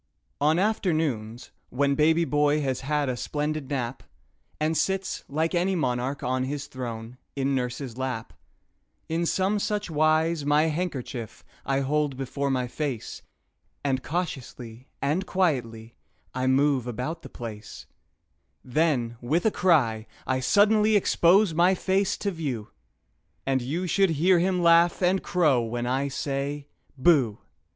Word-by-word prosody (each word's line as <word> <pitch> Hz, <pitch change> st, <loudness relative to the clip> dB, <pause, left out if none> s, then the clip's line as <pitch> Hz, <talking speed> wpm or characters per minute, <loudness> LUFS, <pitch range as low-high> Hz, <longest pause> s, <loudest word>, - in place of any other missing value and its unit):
"BOOH!" 145 Hz, -, +2 dB
On 155 Hz, +2 st, +3 dB
afternoons, 155 Hz, -, -1 dB, 0.2 s
when 140 Hz, +2 st, +1 dB
baby 160 Hz, +3 st, +3 dB
boy 150 Hz, 0 st, +2 dB
has 130 Hz, -2 st, -1 dB
had 145 Hz, +1 st, 0 dB
a 130 Hz, -, -1 dB
splendid 150 Hz, +2 st, -3 dB
nap, 130 Hz, -3 st, -3 dB, 0.6 s
And 155 Hz, +1 st, 0 dB
sits, 190 Hz, +5 st, -1 dB
like 160 Hz, +4 st, 0 dB
any 180 Hz, +2 st, +1 dB
monarch 130 Hz, -3 st, -1 dB
on 130 Hz, +1 st, 0 dB
his 140 Hz, +1 st, -4 dB
throne, 120 Hz, -3 st, -7 dB, 0.2 s
in 140 Hz, 0 st, 0 dB
nurse's 125 Hz, -1 st, -3 dB
lap, 130 Hz, -4 st, -4 dB, 0.8 s
In 165 Hz, +1 st, 0 dB
some 195 Hz, +4 st, +1 dB
such 210 Hz, -2 st, -2 dB
wise 155 Hz, +1 st, +2 dB
my 145 Hz, +1 st, +3 dB
handkerchief 135 Hz, -, -4 dB, 0.2 s
I 135 Hz, 0 st, +1 dB
hold 145 Hz, 0 st, 0 dB
before 140 Hz, +1 st, -2 dB
my 130 Hz, -2 st, 0 dB
face, 135 Hz, -3 st, -4 dB, 0.6 s
And 135 Hz, -2 st, 0 dB
cautiously 130 Hz, -6 st, -5 dB, 0.2 s
and 155 Hz, +8 st, 0 dB
quietly 120 Hz, -11 st, -1 dB, 0.4 s
I 130 Hz, 0 st, -1 dB
move 135 Hz, -1 st, +2 dB
about 125 Hz, +8 st, -4 dB
the -, -, -10 dB
place; 110 Hz, -3 st, -8 dB, 0.8 s
Then, 125 Hz, -4 st, 0 dB
with 155 Hz, -, 0 dB
a 220 Hz, -, +4 dB
cry, 120 Hz, -, +2 dB, 0.2 s
I 130 Hz, 0 st, 0 dB
suddenly 210 Hz, +8 st, +4 dB
expose 190 Hz, -1 st, +4 dB
my 175 Hz, +4 st, +4 dB
face 190 Hz, +1 st, 0 dB
to 200 Hz, -, -2 dB
view, 135 Hz, -, -4 dB, 0.8 s
And 135 Hz, -1 st, +1 dB
you 155 Hz, +9 st, -2 dB
should 195 Hz, +2 st, +3 dB
hear 170 Hz, +3 st, +3 dB
him 180 Hz, 0 st, +1 dB
laugh 170 Hz, +2 st, +4 dB
and 185 Hz, +2 st, +3 dB
crow 155 Hz, -9 st, +2 dB
when 120 Hz, +1 st, -3 dB
I 130 Hz, +3 st, 0 dB
say 140 Hz, +1 st, -3 dB, 0.3 s
"Booh"! 130 Hz, -8 st, +4 dB
145 Hz, 140 wpm, -26 LUFS, 130-170 Hz, 0.8 s, a